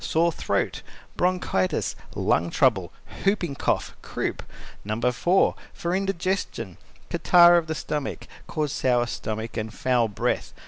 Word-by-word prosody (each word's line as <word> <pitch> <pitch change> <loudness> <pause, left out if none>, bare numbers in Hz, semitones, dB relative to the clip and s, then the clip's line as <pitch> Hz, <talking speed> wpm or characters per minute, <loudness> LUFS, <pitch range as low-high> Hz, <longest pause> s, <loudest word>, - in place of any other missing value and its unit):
Sore 170 +2 +2
throat, - - -1 0.3
bronchitis, 180 - 0 0.2
lung 85 +1 +1
trouble, 100 -6 +2 0.3
whooping 195 -6 +1
cough, 135 - -1
croup. - - -3 0.4
No. 110 +2 -3
4. 125 +11 +3 0.2
For 170 +1 -2
indigestion 185 - -2 0.3
(catarrh 175 0 +7
of 160 - -7
the 160 - -2
stomach) 150 -2 -4 0.2
cause 150 -3 -2
sour 120 -3 +2
stomach 110 -1 -4
and 110 0 -3
foul 120 0 +1
breath. 105 - -2
140 Hz, 125 wpm, -25 LUFS, 110-175 Hz, 0.4 s, catarrh